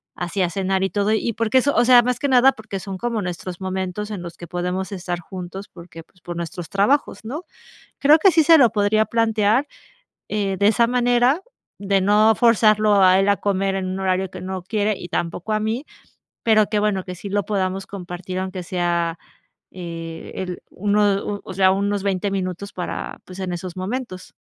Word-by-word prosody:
así 175 Hz, +2 st, -3 dB
a 180 Hz, -, +2 dB
cenar 190 Hz, 0 st, -1 dB
y 195 Hz, -, +1 dB
todo". 205 Hz, +1 st, 0 dB
Y 225 Hz, +1 st, 0 dB
porque 230 Hz, +3 st, +1 dB
eso, 280 Hz, +3 st, +2 dB
o 240 Hz, -, +4 dB
sea, 245 Hz, 0 st, +7 dB
más 250 Hz, 0 st, -1 dB
que 285 Hz, -, 0 dB
nada 260 Hz, +1 st, +6 dB
porque 215 Hz, -3 st, -7 dB
son 195 Hz, -1 st, -6 dB
como 235 Hz, +1 st, -2 dB
nuestros 180 Hz, -1 st, -5 dB
momentos 190 Hz, +2 st, -4 dB
en 200 Hz, -, -5 dB
los 170 Hz, -1 st, -9 dB
que 175 Hz, -, -9 dB
podemos 180 Hz, +3 st, -3 dB
estar 175 Hz, -2 st, -4 dB
juntos 185 Hz, +2 st, -8 dB
porque, 170 Hz, -1 st, -12 dB
pues, 180 Hz, +2 st, -30 dB
por 175 Hz, 0 st, -7 dB
nuestros 170 Hz, 0 st, -6 dB
trabajos, 205 Hz, +1 st, +1 dB
¿no? 295 Hz, +10 st, -5 dB, 0.6 s
Creo 295 Hz, +3 st, +6 dB
que 385 Hz, +2 st, +6 dB
sí 320 Hz, -1 st, +4 dB
se 325 Hz, +1 st, +7 dB
lo 245 Hz, -7 st, +5 dB
podría 215 Hz, 0 st, +2 dB
plantear, 225 Hz, +3 st, +1 dB, 0.6 s
eh, 200 Hz, -2 st, -1 dB
de 200 Hz, +1 st, +3 dB
esa 230 Hz, +2 st, +4 dB
manera, 245 Hz, +5 st, +2 dB, 0.4 s
de 195 Hz, -1 st, +1 dB
no 210 Hz, +3 st, +4 dB
forzarlo 215 Hz, -3 st, +4 dB
a 185 Hz, 0 st, +6 dB
él 195 Hz, -, +2 dB
a 200 Hz, -, +3 dB
comer 195 Hz, -1 st, 0 dB
en 190 Hz, -1 st, -2 dB
un 190 Hz, +1 st, -3 dB
horario 190 Hz, 0 st, 0 dB
que 185 Hz, 0 st, -9 dB
no 185 Hz, 0 st, -4 dB
quiere 210 Hz, +2 st, 0 dB
y 175 Hz, -, -8 dB
tampoco 175 Hz, +6 st, -3 dB
a 215 Hz, -, +1 dB
mí, 225 Hz, +7 st, -2 dB, 0.6 s
pero 215 Hz, -2 st, +4 dB
que 210 Hz, -, -1 dB
bueno, 205 Hz, -3 st, 0 dB
que 180 Hz, -, -6 dB
sí 180 Hz, +3 st, -8 dB
lo 205 Hz, +1 st, 0 dB
podamos 190 Hz, -2 st, -2 dB
compartir, 185 Hz, -1 st, -6 dB
aunque 185 Hz, -1 st, -4 dB
sea, 170 Hz, -1 st, -1 dB, 0.5 s
eh, 165 Hz, -2 st, -7 dB
el 180 Hz, -2 st, -5 dB
uno, 205 Hz, 0 st, +1 dB
u 205 Hz, -1 st, -4 dB
o 190 Hz, -, -8 dB
sea, 190 Hz, 0 st, +4 dB
unos 200 Hz, 0 st, 0 dB
20 200 Hz, 0 st, 0 dB
minutos 190 Hz, 0 st, -4 dB
para 180 Hz, -, -5 dB
pues, 185 Hz, +1 st, -11 dB
en 185 Hz, -2 st, -3 dB
esos 175 Hz, +1 st, -6 dB
momentos. 190 Hz, 0 st, -5 dB
195 Hz, 200 wpm, -21 LUFS, 185-215 Hz, 0.6 s, sea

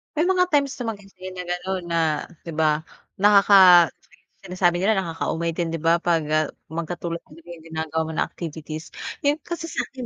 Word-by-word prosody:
May 310 Hz, -, +2 dB
mga 365 Hz, -1 st, +4 dB
times 280 Hz, -1 st, +2 dB
naman 230 Hz, -3 st, -3 dB
kasi 185 Hz, -1 st, -11 dB
na 180 Hz, -, -6 dB
ganun 180 Hz, +1 st, -3 dB
na 170 Hz, -, +1 dB, 0.5 s
'di 165 Hz, -, -6 dB
ba 155 Hz, 0 st, +1 dB, 0.3 s
nakaka 195 Hz, -4 st, +7 dB
si -, -, -30 dB, 0.3 s
sinasabi 180 Hz, -1 st, +1 dB
nila 195 Hz, +5 st, +2 dB
nakaka-umay 170 Hz, -1 st, -2 dB
din 170 Hz, -2 st, -1 dB
'di 165 Hz, -, -3 dB
ba 165 Hz, +1 st, +4 dB
'pag, 170 Hz, -2 st, +1 dB
ah, 155 Hz, 0 st, +2 dB, 0.2 s
magkatulad 170 Hz, +1 st, -4 dB, 0.2 s
yung 165 Hz, 0 st, -12 dB
ginagawa 160 Hz, -1 st, -3 dB
mo 160 Hz, -, -5 dB
na -, -, +1 dB
activities, 155 Hz, -1 st, -8 dB, 0.3 s
yun 295 Hz, +2 st, +2 dB
kasi 340 Hz, 0 st, -5 dB
sa'kin 260 Hz, -4 st, -5 dB
175 Hz, 175 wpm, -23 LUFS, 165-200 Hz, 0.5 s, nakaka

